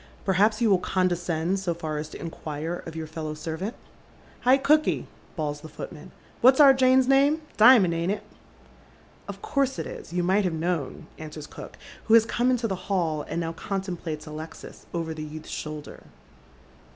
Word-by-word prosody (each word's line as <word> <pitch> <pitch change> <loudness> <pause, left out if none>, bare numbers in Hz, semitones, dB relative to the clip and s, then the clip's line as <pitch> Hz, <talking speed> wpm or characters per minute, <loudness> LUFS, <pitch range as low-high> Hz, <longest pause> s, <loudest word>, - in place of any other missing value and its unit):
" - - -26
Perhaps 210 +4 +3
you 220 - +4
will 190 - +5
condescend 180 0 0
BO 170 -3 -1
far 155 -2 -4
as 150 +1 -5
to - - -10
inquire 160 0 -5
of 165 - -8
your 160 -1 -4
fellow 155 -1 -5
servant? 165 +8 -4 0.2
" - - -28
" - - -26
Hi, 255 +2 +6
cooky," 305 +3 +2 0.3
bawls 150 -3 -3
the'f 160 -1 -12
ootman, 165 +3 -8 0.2
" - - -28
what's 260 +3 +6
our 280 -2 +9
Jane's 260 0 +4
name? 280 +4 +4
Dimond, 215 -6 +7
ain't 170 +3 0
it? 210 - -3 0.6
" - - -28
"Of - - -8
course 275 -10 0
it - - -3
is. - - -8
You 175 0 0
might 190 +4 +3
have 180 -3 0
known," 160 -3 -2
answers 155 -1 -8
cook, - - -11 0.3
who 220 - +5
has 225 -1 +6
come 245 +2 +1
into 245 -2 +1
the 190 -1 -6
hall, 165 -6 0
and - - -2
now 165 -1 -3
contemplates 175 -5 -4
Alexis 155 +1 -9
over 165 -2 -3
the 155 - -7
youth's 155 +1 -8
shoulder. 150 -1 -6
175 Hz, 190 wpm, -26 LUFS, 160-225 Hz, 0.6 s, our